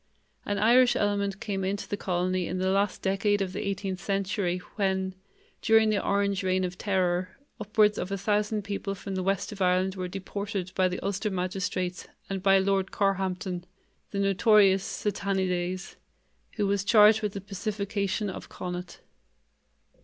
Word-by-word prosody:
An 205 - 0
Irish 240 +4 +5
element 200 -1 0
came 195 -3 -3
into 195 +2 -2
the - - -2
colony 185 -2 -1
in 180 - -3
the 185 +1 +1
last 200 0 0
decade 195 +2 +1
of 190 -2 -2
the 200 - -3
eighteenth 195 -1 -3
century 195 -1 -1 0.2
when, 190 -2 0 0.5
during 220 -1 +4
the 205 -2 0
Orange 200 0 +1
reign 185 0 +1
of 180 0 -3
terror, 185 -1 0 0.2
upwards 210 0 +2
of 185 - -4
a 200 - -1
thousand 210 +1 0
people 200 0 -3
from 195 0 -6
the 190 - -1
west 195 +2 -1
of 205 -2 -8
Ireland 185 +1 +2
were 185 -1 -4
deported 195 0 -5
by 185 -1 +3
the 180 0 -3
Ulster 200 +2 -1
magistrates 185 -1 -3 0.2
and 195 -1 -2
by 195 0 +5
Lord 195 0 +1
Carhampton, 190 -2 -1 0.5
the 200 - -5
notorious 195 -1 +4
"Satanides", 185 -3 -2 0.6
who 210 - 0
was 200 -1 +1
charged 215 +1 +6
with 210 -2 -2
the 200 - -4
pacification 200 +1 -2
of 190 - -7
Connacht. 180 0 -6
195 Hz, 160 wpm, -28 LUFS, 185-205 Hz, 0.6 s, charged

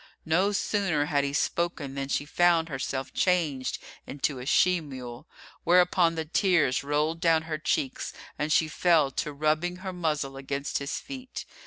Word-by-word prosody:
No 180 +5 +2
sooner 195 -7 0
had 145 -1 +1
he 140 - -1
spoken 155 -1 -1
than 135 0 -3
she 145 - -1
found 165 +1 +3
herself 135 -1 -4
changed 160 -8 +1 0.3
into 140 -1 -2
a 125 - -7
she 180 +2 +4
mule, 125 -5 -9 0.4
whereupon 175 -1 +4
the 160 -1 -3
tears 165 -6 +2
rolled 150 +3 0
down 165 -1 +3
her 155 -1 -4
cheeks 135 -3 -1 0.2
and 150 +1 -2
she 160 - +4
fell 155 -3 +3
to 150 - -3
rubbing 155 +4 0
her 190 - -3
muzzle 150 -6 -2
against 140 +1 -3
his 140 0 -3
feet. 260 -1 -8
155 Hz, 160 wpm, -27 LUFS, 140-175 Hz, 0.4 s, she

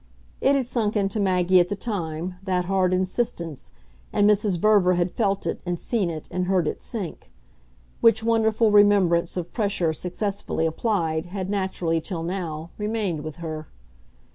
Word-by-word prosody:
It 280 - +4
had 270 -2 +1
sunk 225 -3 -1
into 200 +1 0
Maggie 185 -2 +3
at 175 0 +2
the 205 - -1
time, 180 -5 -3
that 185 -2 -1
hard 185 -1 +2
insistence, 185 - -2 0.4
and 205 - +3
Mrs. 210 -3 +2
Verver 195 -1 +4
had 175 0 0
felt 200 -3 0
it - - -2
and 175 -1 -2
seen 205 -1 0
it 155 -2 -6
and 180 0 -1
heard 185 -4 +2
it - - -3
sink; 200 -8 -6 0.7
which 225 -1 +4
wonderful 225 -1 +3
remembrance 195 -5 +4
of 175 -1 -4
pressure 195 -7 0
successfully 180 0 -2
applied 165 -2 -1
had 190 +1 -4
naturally, 185 -4 -1
till 165 -1 -4
now, 170 -3 -4
remained 210 -7 -1
with 155 -1 -6
her. 155 -2 -6
185 Hz, 160 wpm, -24 LUFS, 170-210 Hz, 0.7 s, It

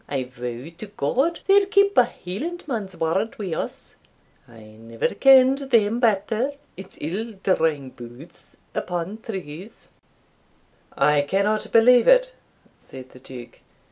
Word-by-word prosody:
I 135 -2 -2
vow 125 +3 -8
to 215 - -7
God 270 - 0
they'll 395 0 +4
keep 400 0 +3
a - - +6
Hielandman's 230 - -6
word 190 +11 -2
wi' 195 -6 -4
us - - -6 0.5
I 115 -2 -16 0.2
never 115 0 -3
ken'd 270 0 +5
them 230 -2 +2
better 230 +3 0 0.2
it's 190 +1 -12
ill 210 +9 -4
drawing 155 -8 0
boots 120 +7 -14 0.2
upon 180 +4 -4
trews." 190 0 -9 1.1
"I 150 -1 +3
cannot 200 +8 -1
believe 240 +2 +5
it," - - +4 0.5
said 130 -1 -11
the 125 - -15
Duke. 125 -2 -12
195 Hz, 125 wpm, -23 LUFS, -, 1.1 s, a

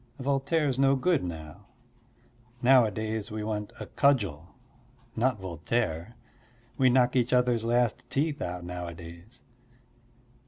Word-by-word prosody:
Voltaire's 140 +1 0
no 135 0 +4
good 160 +3 +1
now; 80 +2 -8 1.0
nowadays 110 -4 +3
we 110 -1 -4
want 105 -1 -3
a - - -5
cudgel, 100 - 0 0.6
not 120 -1 +1
Voltaire. 90 +2 -2 0.6
We 130 -1 +4
knock 125 0 +3
each 125 -1 +2
other's 125 -2 +2
last 120 0 0
teeth 145 +3 -1
out 90 0 -4
nowadays. 85 +2 -8
115 Hz, 110 wpm, -28 LUFS, 90-130 Hz, 1.0 s, no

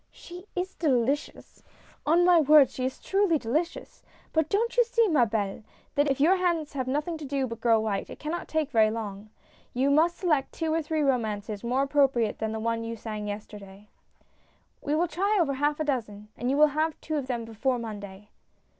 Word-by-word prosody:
She 360 +3 -12
is 365 +1 -3
delicious! 280 -3 -1 0.5
on 340 +3 +4
my 355 -2 +6
word 300 -3 +6
she 255 - -3
is 260 - -3
truly 390 -4 +2
delicious 300 +7 -3
I - - -33 0.2
But 320 -1 +1
don't 460 +4 0
you 485 - +6
see, 465 -1 +2
ma 285 - +3
helle, 205 -1 -2 0.3
that 290 0 +2
if 270 - 0
your 345 +7 +4
hands 340 -5 -1
have 260 -2 -3
nothing 300 +5 -2
to 300 - -7
do 275 -1 -1
but 230 -2 -7
grow 230 -1 +4
white, 210 -3 -2
that - - -8
it - - -14
cannot 315 +3 -4
take 315 -3 -1
very 220 -1 +4
long. 215 -2 -6 0.5
You 265 +3 +2
must 330 +4 +3
select 305 -7 0
two 320 -1 -2
or 325 - +1
three 310 0 -2
romances 215 -6 -1
more 250 +3 +1
appropriate 270 -6 +1
than 220 0 -2
the 220 - -4
one 230 +1 -1
you 230 0 -4
sang 215 -2 -6
yesterday." 205 -1 -9 0.9
"We 290 - -1
will 340 +3 +2
try 395 +6 0
over 320 -5 +2
a - - -3
half 295 0 +2
dozen, 220 -9 -3
and 245 - -3
you 275 - +1
will 305 0 +6
have 310 +1 -1
two 310 -1 -3
of 275 -3 -3
them 240 -3 -3
before 235 +3 -1
Monday." 205 -3 -8
275 Hz, 205 wpm, -27 LUFS, 225-315 Hz, 0.9 s, my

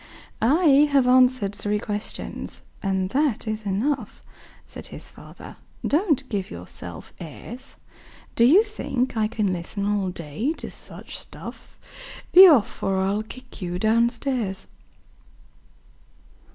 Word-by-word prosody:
"I 290 +2 +5
have 275 -3 +4
answered 250 -5 +4
three 205 0 -1
questions, 210 0 -5 0.2
and 190 -1 -1
that 275 -6 0
is 215 -1 -3
enough," 225 +4 -2 0.4
Said - - -9
his - - -11
father. - - -12 0.3
"Don't 300 -4 +1
give 200 -5 -3
yourself 85 -1 -9
airs! 225 - -9 0.6
Do 235 - +3
you 330 - +7
think 260 - -3
I 215 -1 +2
can 210 -4 -1
listen 180 +3 -4
all 205 -2 0
day 180 - -3
to - - -7
such - - -9
stuff? - - -11 0.5
Be 375 +2 +11
off, 270 - +3
or 195 0 0
I'll 195 +2 0
kick 245 +2 -12
you 175 -1 -3
down 225 +4 +3
stairs. 235 -6 -3
220 Hz, 125 wpm, -24 LUFS, 195-265 Hz, 0.6 s, Be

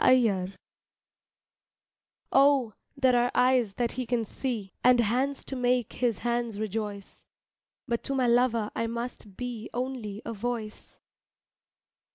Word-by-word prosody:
A 255 0 +7
CRY 195 -3 0 1.8
OH, 270 -5 +4 0.2
there 260 -2 +4
are 245 0 +3
eyes 250 -5 +3
that 240 -1 0
he 255 -1 -4
can 235 -2 0
see, 220 -4 -4
And 250 0 +6
hands 255 +5 +1
to 270 - -4
make 250 -2 +1
his 240 -4 0
hands 235 -3 -1
rejoice, 210 -1 -5 0.6
But 235 -2 -1
to 275 - -1
my 260 -2 +2
lover 235 -2 +2
I 230 - 0
must 235 -4 -6
be 245 -3 -5
Only 240 -5 -4
a 230 - -4
voice. 225 0 -5
240 Hz, 135 wpm, -28 LUFS, 220-250 Hz, 1.8 s, A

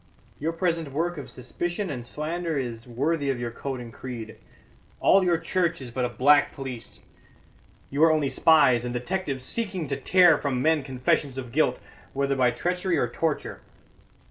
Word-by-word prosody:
Your 160 +3 -1
present 165 -3 -1
work 170 +2 -1
of 140 - -8
suspicion 175 +8 -4
and 125 -4 -5
slander 160 +4 -3
is 120 -3 -4
worthy 140 +4 -1
of 130 -3 -1
your 120 -1 -3
coat 135 +2 -5
and 120 -2 -9
creed. 115 -4 -7 0.6
All 195 - +5
your 175 -2 +3
church 165 0 -1
is 130 -3 -8
but 125 +1 -1
a - - -2
black 145 +5 +4
police; 130 -4 -8 0.9
you 145 +3 +2
are 165 - +7
only 155 -3 +2
spies 130 -8 +4
and 125 0 -4
detectives 135 -1 -3
seeking 190 - -3
to 140 -1 -2
tear 175 -5 +5
from 135 -3 -1
men 155 +2 +2
confessions 130 +1 -1
of 125 -3 -6
guilt, - - +2 0.4
whether 140 0 0
by 130 -2 +3
treachery 180 +8 -1
or 120 - +1
torture. 155 +6 -3
140 Hz, 170 wpm, -26 LUFS, 125-165 Hz, 0.9 s, are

